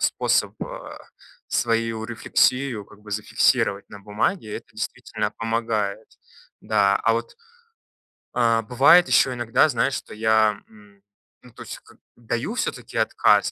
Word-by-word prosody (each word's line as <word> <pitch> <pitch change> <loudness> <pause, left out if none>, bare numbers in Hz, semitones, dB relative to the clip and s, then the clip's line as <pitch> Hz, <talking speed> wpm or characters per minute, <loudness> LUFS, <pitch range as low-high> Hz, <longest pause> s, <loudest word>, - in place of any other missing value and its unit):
способ, - - +1
э, - - -8 0.5
свою 115 -1 0
рефлексию, 120 0 0
как 100 - -18
бы, 105 0 -13
зафиксировать 100 -1 +1
на 105 - -11
бумаге, 105 - -2
это - - -10
действительно 105 -1 -4
помогает. 110 -2 -2 0.5
Да. 100 0 +2
А 115 - +3
вот 115 +1 -3 1.0
А, 115 -2 +2
бывает 135 +10 +5
ещё 130 - +3
иногда, 120 +5 +2
знаешь, 130 +1 0
что 130 - -6
я, 110 -1 +2
м, 105 -2 -20 0.4
ну, 125 - -16
то - - -14
есть - - -7
как, - - -20 0.2
даю 120 - -4
всё-таки 255 - -4
отказ, - - +3
115 Hz, 135 wpm, -23 LUFS, 105-120 Hz, 1.0 s, бывает